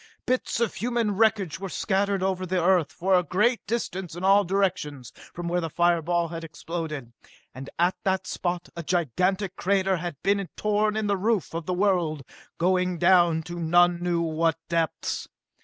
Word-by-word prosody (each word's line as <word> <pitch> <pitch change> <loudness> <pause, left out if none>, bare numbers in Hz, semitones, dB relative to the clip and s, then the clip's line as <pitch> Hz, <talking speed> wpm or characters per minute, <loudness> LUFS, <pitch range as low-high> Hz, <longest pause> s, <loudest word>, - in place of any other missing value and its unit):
Bits 255 -2 0
of 235 -3 0
human 235 -3 -1
wreckage 205 -6 +2
were 195 0 -5
scattered 195 +1 0
over 190 -1 -1
the 185 0 0
Earth 175 -2 +3
for 190 +2 0
a 180 - +6
great 210 +8 +1
distance 190 -6 -3
in 175 - -7
all 200 +2 +5
directions 185 -9 -1 0.2
from 175 0 -6
where 175 +1 0
the 165 - -3
fire 170 +1 +2
ball 170 +1 0
had 165 0 -6
exploded. 160 -6 -6 0.4
And 135 +1 -8
at 175 +2 +2
that 190 -1 0
spot 175 -1 -3
a 170 - -4
gigantic 180 - 0
crater 190 0 +1
had 175 -2 -4
been 200 -1 +1
torn 210 0 +1
in 220 - -1
the 200 -1 +1
roof 210 -3 0
of 165 -1 -5
the 180 - 0
world, 175 -7 +1 0.3
going 180 0 +1
down 175 -2 +4
to 175 0 -7
none 175 +1 +3
knew 175 -1 0
what 165 0 0
depths. 165 -2 -1
180 Hz, 175 wpm, -26 LUFS, 170-195 Hz, 0.4 s, a